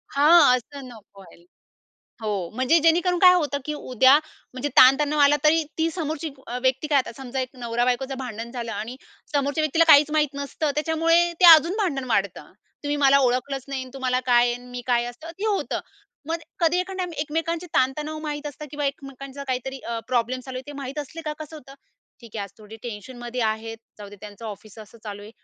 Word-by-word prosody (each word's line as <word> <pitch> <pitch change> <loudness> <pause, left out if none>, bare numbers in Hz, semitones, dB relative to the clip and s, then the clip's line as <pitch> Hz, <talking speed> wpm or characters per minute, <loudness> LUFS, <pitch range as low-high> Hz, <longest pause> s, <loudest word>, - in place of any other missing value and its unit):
हां. 290 -2 +6
असं 270 +2 -10
नको 210 -4 -15
व्हायल 170 -2 -17 0.8
हो. 200 -5 -3
म्हणजे 260 +6 +3
जेणेकरून 345 +3 +3
काय 365 0 +8
होतं? 295 -5 0
की 300 - -3
उद्या 260 0 +4 0.3
म्हणजे 260 +3 -3
ताणतणाव 290 +3 +6
आला 285 +1 +6
तरी, 320 +2 +4 0.2
ती 320 - +2
समोरची 315 -1 -4 0.2
अ, 245 +1 -4
व्यक्ती 265 +3 +1
काय 290 -2 +4
आता 260 - -2
समजा 265 0 -5
एक 255 - -3
नवरा-बायकोचं 245 +3 -1
भांडण 235 -3 -6
झालं. 235 -2 -5
आणि 225 +4 -6 0.4
समोरच्या 285 +2 0
व्यक्तीला 315 +2 +3
काहीच 290 +1 +6
माहीत 295 -2 +1
नसतं, 285 +2 -2
त्याच्यामुळे 330 +3 +2
ते - - +4
अजून 335 +5 +2
भांडण 285 -10 -1
वाढतं. 195 -8 -1 0.3
तुम्ही 290 0 -1
मला 275 +1 +6
ओळखलंच 255 +1 0
नाही 270 -1 -3
आणि 260 - -10
तुम्हाला 255 -1 0
काय 240 -1 +5
आहे? 240 - 0
आणि 245 +1 -11
मी 245 - -6
काय? 240 -1 +2
असं 245 +7 -9
ते 420 - -2
होतं. 410 -2 -1 0.5
मग 330 - 0 0.2
कधी 340 +1 +3
एका 370 +1 -5
टाइम 360 -1 -2
एकमेकांचे 325 +3 -2
ताणतणाव 300 +4 0
माहित 295 -1 -4
असतं 295 +1 -8
किंवा 290 -1 -2
एकमेकांचा 275 0 -7
काहीतरी 265 0 -4
अ, 235 0 -3
प्रॉब्लेम 250 0 0
चालू 255 0 -8
आहे - - -7
ते 290 - -8
माहीत 270 +3 -6
असले 295 +3 -7
का - - -1
कसं 310 0 -9
होतं? 275 -2 -13 0.5
ठीक 230 -2 -11
आहे, 205 - -2
आज 200 - -8
थोडी 215 +1 -12
टेन्शनमध्ये 240 +2 -7
आहेत 220 +1 -2 0.2
जाऊदे 205 0 -10
त्यांचं 210 +2 -11
ऑफिस 210 +1 -10
असं 215 +1 -13
चालू 205 -1 -7
आहे. 210 - -11
270 Hz, 200 wpm, -24 LUFS, 240-300 Hz, 0.8 s, काय